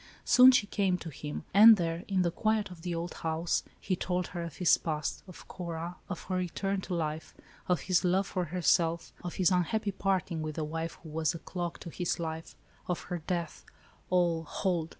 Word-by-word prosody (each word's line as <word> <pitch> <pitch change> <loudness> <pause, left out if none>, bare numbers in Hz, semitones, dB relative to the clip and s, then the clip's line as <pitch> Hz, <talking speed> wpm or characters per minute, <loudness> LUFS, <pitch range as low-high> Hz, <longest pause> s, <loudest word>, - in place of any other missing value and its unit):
Soon 255 +1 +8
she 250 -5 +3
came 195 -3 +1
to 165 - -8
him; 150 +2 -6
and 215 +3 +9
there, 170 0 -2
in 190 -2 +2
the 170 - +1
quiet 215 +1 0
of 170 -2 -11
the 175 0 -3
old 170 +1 -4
house, 160 +1 -1 0.2
Jie 190 - 0
told 180 0 -1
her 175 - -5
of 170 -3 -6
his 180 - +5
past, 155 -2 -3
of 185 - -12
Cora, 170 0 -5
of 180 - -5
her 185 0 -2
return 190 +2 -2
to 180 - -4
life, 155 -1 -3 0.3
of 180 -2 +1
his 185 -2 +2
love 185 +2 +2
for 185 -2 -2
herself, 170 0 +1
of 175 - -5
his 185 0 +3
unhappy 200 +4 +1
parting 190 -4 -1
with 155 -1 -4
the 160 - -2
wife 160 +2 -4
who 160 - -9
was 160 +2 0
a - - -3
clog 175 0 -5
to 170 - -7
his 175 0 -2
life, 160 -1 -5 0.3
of 180 - -1
her 175 - -2
death 170 0 -4 0.2
— - - -31
all 175 -3 +2
(hold 165 0 -1
175 Hz, 210 wpm, -30 LUFS, 165-185 Hz, 0.3 s, and